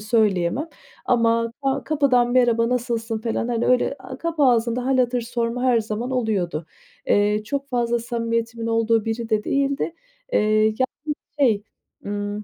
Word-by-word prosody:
söyleyemem 210 Hz, -, +1 dB, 0.4 s
ama 230 Hz, -1 st, +2 dB
ka 270 Hz, -1 st, 0 dB
kapıdan 260 Hz, -5 st, +2 dB
"Merhaba, 235 Hz, -2 st, +3 dB
nasılsın?" 235 Hz, -2 st, -1 dB
falan, 230 Hz, +1 st, -2 dB
hani, 235 Hz, -1 st, 0 dB
öyle, 250 Hz, +2 st, +2 dB
aaa, 260 Hz, -, -9 dB
kapı 330 Hz, -3 st, -1 dB
ağzında 240 Hz, -1 st, +2 dB
hâl 265 Hz, -1 st, +2 dB
hatır 250 Hz, 0 st, +2 dB
sorma 235 Hz, +1 st, -2 dB
her 245 Hz, -3 st, +3 dB
zaman 220 Hz, +4 st, -4 dB
oluyordu. 195 Hz, -10 st, -1 dB, 0.4 s
Eee, 205 Hz, +1 st, +3 dB
çok 280 Hz, +3 st, -3 dB
fazla 240 Hz, -2 st, 0 dB
samimiyetimin 230 Hz, -1 st, -2 dB
olduğu 225 Hz, -1 st, +2 dB
biri 225 Hz, 0 st, -3 dB
de 215 Hz, -1 st, +1 dB
değildi, 280 Hz, +4 st, 0 dB, 0.4 s
eee, -, -, +4 dB, 0.2 s
yani 215 Hz, 0 st, +2 dB, 0.7 s
şey, 225 Hz, -7 st, +3 dB, 0.4 s
ımm, 205 Hz, +1 st, -3 dB
230 Hz, 145 wpm, -23 LUFS, 225-250 Hz, 0.7 s, eee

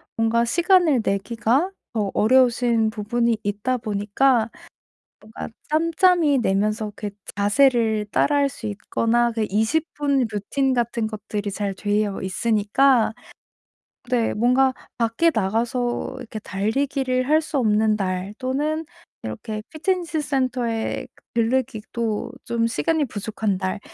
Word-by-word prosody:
뭔가 230 Hz, +1 st, +2 dB
시간을 345 Hz, -, +3 dB
내기가 235 Hz, -, 0 dB, 0.2 s
어 210 Hz, -4 st, 0 dB
어려우신 235 Hz, -1 st, +3 dB
부분이 225 Hz, +1 st, 0 dB
있다 205 Hz, +5 st, -1 dB
보니까 220 Hz, +3 st, +1 dB, 0.7 s
뭔가 215 Hz, +1 st, -8 dB, 0.2 s
짬짬이 330 Hz, -1 st, +3 dB
내면서 210 Hz, 0 st, 0 dB
그 210 Hz, -, -4 dB, 0.3 s
자세를 220 Hz, 0 st, +3 dB
따라 290 Hz, 0 st, +3 dB
할 280 Hz, -1 st, +3 dB
수 255 Hz, -4 st, -9 dB
있거나 230 Hz, +3 st, 0 dB
그 225 Hz, -1 st, 0 dB
20 220 Hz, +11 st, +1 dB
분 280 Hz, -3 st, +1 dB
루틴 260 Hz, +6 st, 0 dB
같은 235 Hz, -2 st, 0 dB
것들이 210 Hz, -1 st, -4 dB
잘 200 Hz, 0 st, -2 dB
되어 205 Hz, 0 st, -1 dB
있으니까 220 Hz, +5 st, +2 dB, 1.0 s
네 235 Hz, -2 st, +1 dB
뭔가 250 Hz, +4 st, +3 dB, 0.2 s
밖에 230 Hz, +9 st, +2 dB
나가서 240 Hz, +5 st, -1 dB
이렇게 225 Hz, -3 st, -8 dB
달리기를 255 Hz, +7 st, -1 dB
할 310 Hz, +2 st, +4 dB
수 310 Hz, -1 st, -3 dB
없는 215 Hz, -3 st, +3 dB
날 185 Hz, -1 st, -2 dB
또는 295 Hz, +5 st, -1 dB, 0.4 s
이렇게 215 Hz, -, -5 dB
피트니스 340 Hz, 0 st, -1 dB
센터에 255 Hz, -5 st, -1 dB, 0.3 s
들르기도 230 Hz, -1 st, -1 dB
좀 230 Hz, -1 st, 0 dB
시간이 310 Hz, +6 st, 0 dB
부족한 215 Hz, -3 st, -2 dB
날 185 Hz, +2 st, -2 dB
230 Hz, 250 characters per minute, -23 LUFS, 210-265 Hz, 1.0 s, 할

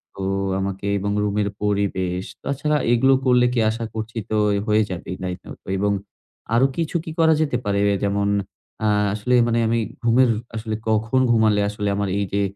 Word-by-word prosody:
তো 95 Hz, -, -5 dB, 0.4 s
আমাকে 95 Hz, +1 st, -3 dB
এবং 100 Hz, +1 st, -2 dB
রুমের 105 Hz, 0 st, 0 dB
পরিবেশ। 95 Hz, -3 st, 0 dB, 0.2 s
তাছাড়া 145 Hz, +2 st, 0 dB, 0.2 s
এগুলো 130 Hz, +3 st, +4 dB
করলে 125 Hz, -1 st, +4 dB
কি 120 Hz, -, +1 dB
আশা 115 Hz, +1 st, -3 dB
করছি, 110 Hz, +1 st, -5 dB
তো 110 Hz, -, -1 dB, 0.2 s
এই 100 Hz, -, 0 dB
হয়ে 110 Hz, 0 st, +3 dB
যাবেই 90 Hz, 0 st, -5 dB
নাইট 90 Hz, 0 st, -4 dB
আউট -, -, -10 dB, 0.2 s
এবং 100 Hz, +1 st, +1 dB, 0.6 s
আরো 120 Hz, +3 st, +5 dB
কিছু 165 Hz, 0 st, -2 dB
কি 160 Hz, -, -5 dB
করা 160 Hz, -1 st, +5 dB
যেতে 145 Hz, -5 st, +1 dB
পারে? 100 Hz, -1 st, +1 dB
এ -, -, +1 dB
যেমন, 100 Hz, 0 st, +1 dB, 0.6 s
আ -, -, +3 dB, 0.3 s
আসলে 110 Hz, +4 st, -1 dB
মানে 115 Hz, 0 st, +1 dB
আমি 115 Hz, +1 st, +1 dB, 0.2 s
ঘুমের 120 Hz, +2 st, +4 dB, 0.3 s
আসলে 110 Hz, 0 st, -3 dB
কখন 110 Hz, +4 st, +1 dB
ঘুমালে 110 Hz, -3 st, +3 dB
আসলে, 105 Hz, 0 st, -3 dB
আমার 100 Hz, -1 st, -1 dB
এই 100 Hz, -, 0 dB
যে 100 Hz, -, +2 dB
110 Hz, 180 wpm, -22 LUFS, 100-120 Hz, 0.6 s, আরো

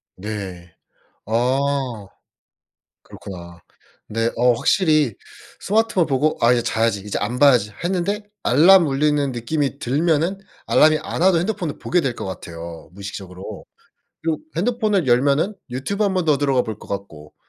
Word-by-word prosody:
네. 95 Hz, -4 st, -7 dB, 0.5 s
아. 125 Hz, -1 st, 0 dB, 1.0 s
그렇구나. 85 Hz, -3 st, -11 dB, 0.5 s
네. 115 Hz, +2 st, 0 dB
어 125 Hz, 0 st, +4 dB
확실히 155 Hz, -, +2 dB, 0.5 s
스마트폰 210 Hz, -4 st, +1 dB
보고 145 Hz, +3 st, +1 dB
'아 120 Hz, +1 st, +6 dB
이제 120 Hz, -1 st, +2 dB
자야지. 110 Hz, -2 st, 0 dB
이제 105 Hz, +1 st, -4 dB
안 115 Hz, +5 st, -2 dB
봐야지.' 125 Hz, -7 st, +4 dB
했는데 190 Hz, +3 st, -1 dB, 0.2 s
알람 170 Hz, +6 st, +6 dB
울리는 145 Hz, 0 st, +1 dB
느낌이 140 Hz, +4 st, -2 dB
들면은 160 Hz, +7 st, 0 dB, 0.3 s
알람이 155 Hz, 0 st, +5 dB
안 -, -, -3 dB
와도 185 Hz, -2 st, +5 dB
핸드폰을 175 Hz, -4 st, -3 dB
보게 180 Hz, -, +1 dB
될 135 Hz, -6 st, -2 dB
것 -, -, -6 dB
같아요, 85 Hz, -3 st, -8 dB
무의식적으로. 95 Hz, -1 st, -8 dB, 0.6 s
그리고 160 Hz, -1 st, 0 dB, 0.2 s
핸드폰을 210 Hz, -, +1 dB
열면은 140 Hz, -, +2 dB, 0.2 s
유튜브 200 Hz, +12 st, -2 dB
1 195 Hz, -1 st, 0 dB
번 180 Hz, -2 st, 0 dB
더 150 Hz, -3 st, +3 dB
들어가 135 Hz, -3 st, +2 dB
볼 110 Hz, -3 st, -6 dB
것 -, -, -14 dB
같고. 80 Hz, -7 st, -7 dB
135 Hz, 300 characters per minute, -21 LUFS, 105-165 Hz, 1.0 s, 아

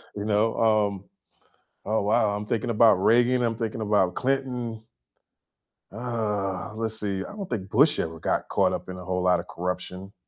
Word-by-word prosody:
You 100 Hz, 0 st, -4 dB
know? 110 Hz, +1 st, +2 dB
Um 105 Hz, -3 st, +1 dB, 0.8 s
oh, 110 Hz, +1 st, 0 dB
wow, 105 Hz, +1 st, +2 dB
I'm 105 Hz, 0 st, -5 dB
thinking 115 Hz, +2 st, -1 dB
about 115 Hz, 0 st, +6 dB
Reagan, 120 Hz, +6 st, +3 dB
I'm 115 Hz, -2 st, 0 dB
thinking 115 Hz, -1 st, -3 dB
about 100 Hz, -4 st, +2 dB
Clinton. 125 Hz, -4 st, -2 dB, 1.1 s
Uh, 105 Hz, -4 st, -3 dB
let's 110 Hz, 0 st, -3 dB
see, 100 Hz, -2 st, -2 dB
I -, -, -9 dB
don't 200 Hz, -3 st, -6 dB
think 95 Hz, -5 st, -4 dB
Bush 145 Hz, +9 st, +4 dB
ever 80 Hz, 0 st, -3 dB
got -, -, -1 dB
caught -, -, +2 dB
up -, -, -5 dB
in 90 Hz, -, -6 dB
a 90 Hz, -, -8 dB
whole 90 Hz, 0 st, -2 dB
lotta 90 Hz, -1 st, +3 dB
corruption. 90 Hz, +2 st, -5 dB
105 Hz, 170 wpm, -26 LUFS, 95-115 Hz, 1.1 s, about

